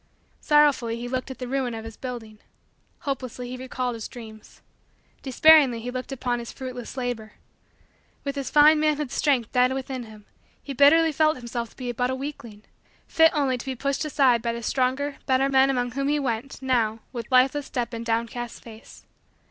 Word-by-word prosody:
Sorrowfully 290 Hz, -6 st, +3 dB
he 240 Hz, +1 st, -5 dB
looked 255 Hz, +1 st, -3 dB
at 265 Hz, -, -7 dB
the 250 Hz, -, -6 dB
ruin 255 Hz, -2 st, -2 dB
of 225 Hz, 0 st, -7 dB
his 225 Hz, -1 st, -9 dB
building. 230 Hz, -4 st, -8 dB, 0.6 s
Hopelessly 255 Hz, -4 st, -4 dB
he -, -, -4 dB
recalled 255 Hz, -1 st, -3 dB
his 225 Hz, -2 st, -6 dB
dreams. 220 Hz, -3 st, -13 dB, 0.6 s
Despairingly 275 Hz, -2 st, +5 dB
he 245 Hz, +2 st, -5 dB
looked 255 Hz, +2 st, -6 dB
upon 245 Hz, -2 st, -2 dB
his 235 Hz, -, -7 dB
fruitless 255 Hz, -1 st, -8 dB
labor. 245 Hz, -4 st, -4 dB, 0.9 s
With 280 Hz, 0 st, -3 dB
his 275 Hz, -2 st, -4 dB
fine 300 Hz, +1 st, +6 dB
manhood's 300 Hz, -3 st, 0 dB
strength 260 Hz, -7 st, +1 dB
dead 250 Hz, 0 st, +3 dB
within 265 Hz, -2 st, -5 dB
him, 215 Hz, -2 st, -14 dB, 0.4 s
he 280 Hz, -, -6 dB
bitterly 315 Hz, +4 st, +5 dB
felt 310 Hz, 0 st, +2 dB
himself 235 Hz, -1 st, -5 dB
to -, -, -23 dB
be 250 Hz, -2 st, -4 dB
but 245 Hz, +1 st, -1 dB
a 260 Hz, -, -1 dB
weakling; 240 Hz, -6 st, -8 dB, 0.4 s
fit 325 Hz, 0 st, +5 dB
only 265 Hz, -4 st, +1 dB
to -, -, -8 dB
be 265 Hz, -, -2 dB
pushed 275 Hz, +4 st, -2 dB
aside 270 Hz, -6 st, +3 dB
by 235 Hz, 0 st, -2 dB
the 235 Hz, 0 st, -6 dB
stronger, 265 Hz, +4 st, -1 dB
better, 265 Hz, 0 st, +2 dB
men 265 Hz, 0 st, +4 dB
among 245 Hz, -2 st, 0 dB
whom 275 Hz, +2 st, -2 dB
he 295 Hz, +1 st, +2 dB
went, 265 Hz, 0 st, -3 dB
now, 230 Hz, -4 st, +1 dB
with 235 Hz, 0 st, -6 dB
lifeless 265 Hz, +3 st, +3 dB
step 240 Hz, -1 st, -3 dB
and 230 Hz, 0 st, -4 dB
downcast 235 Hz, +1 st, -3 dB
face. 225 Hz, -1 st, -14 dB
255 Hz, 185 wpm, -25 LUFS, 235-275 Hz, 0.9 s, fine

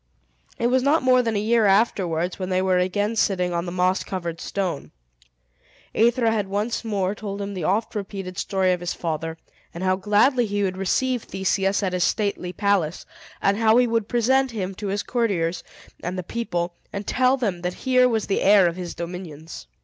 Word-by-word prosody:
It -, -, -1 dB
was 255 Hz, +2 st, +3 dB
not 285 Hz, +4 st, +2 dB
more 255 Hz, -1 st, +5 dB
than 225 Hz, -2 st, -1 dB
a -, -, +1 dB
year 220 Hz, +1 st, +3 dB
afterwards 185 Hz, -4 st, +1 dB
when 185 Hz, 0 st, -3 dB
they 185 Hz, 0 st, +1 dB
were 185 Hz, -1 st, +2 dB
again 205 Hz, +4 st, 0 dB
sitting 180 Hz, -5 st, +1 dB
on 170 Hz, +1 st, -2 dB
the -, -, -4 dB
moss 185 Hz, +1 st, +1 dB
covered 170 Hz, -3 st, -5 dB
stone. 185 Hz, -7 st, -3 dB, 1.0 s
Aethra 235 Hz, 0 st, +3 dB
had 210 Hz, -3 st, -1 dB
once 205 Hz, +5 st, -2 dB
more 200 Hz, -4 st, -1 dB
told 205 Hz, -1 st, -6 dB
him 200 Hz, 0 st, -4 dB
the 180 Hz, -5 st, -4 dB
oft 210 Hz, +6 st, 0 dB
repeated 195 Hz, -3 st, -5 dB
story 190 Hz, -2 st, +1 dB
of 180 Hz, -, -2 dB
his 175 Hz, 0 st, -3 dB
father, 160 Hz, -1 st, -3 dB, 0.4 s
and 175 Hz, -, -5 dB
how 185 Hz, 0 st, +2 dB
gladly 215 Hz, +5 st, +3 dB
he 205 Hz, 0 st, -1 dB
would 185 Hz, -1 st, -1 dB
receive 245 Hz, +6 st, 0 dB
Theseus 195 Hz, +1 st, 0 dB
at 185 Hz, -2 st, -1 dB
his 180 Hz, -1 st, +1 dB
stately 200 Hz, -4 st, -1 dB
palace, 190 Hz, -4 st, 0 dB, 0.4 s
and 200 Hz, +1 st, +3 dB
how 225 Hz, 0 st, +4 dB
he 250 Hz, -, +5 dB
would 230 Hz, -3 st, 0 dB
present 265 Hz, +3 st, +2 dB
him 195 Hz, -5 st, -4 dB
to 205 Hz, +2 st, -6 dB
his 200 Hz, +1 st, -1 dB
courtiers 185 Hz, -9 st, -1 dB, 0.4 s
and 180 Hz, +2 st, -4 dB
the 185 Hz, -, -3 dB
people, 175 Hz, -5 st, -3 dB, 0.2 s
and 200 Hz, 0 st, -5 dB
tell 255 Hz, +1 st, +2 dB
them 200 Hz, -9 st, -2 dB
that 180 Hz, +1 st, -3 dB
here 255 Hz, -1 st, +5 dB
was 220 Hz, -3 st, 0 dB
the 195 Hz, -, 0 dB
heir 200 Hz, -1 st, +6 dB
of 170 Hz, 0 st, 0 dB
his 180 Hz, -2 st, -6 dB
dominions. 170 Hz, -, -7 dB
195 Hz, 195 wpm, -23 LUFS, 180-225 Hz, 1.0 s, heir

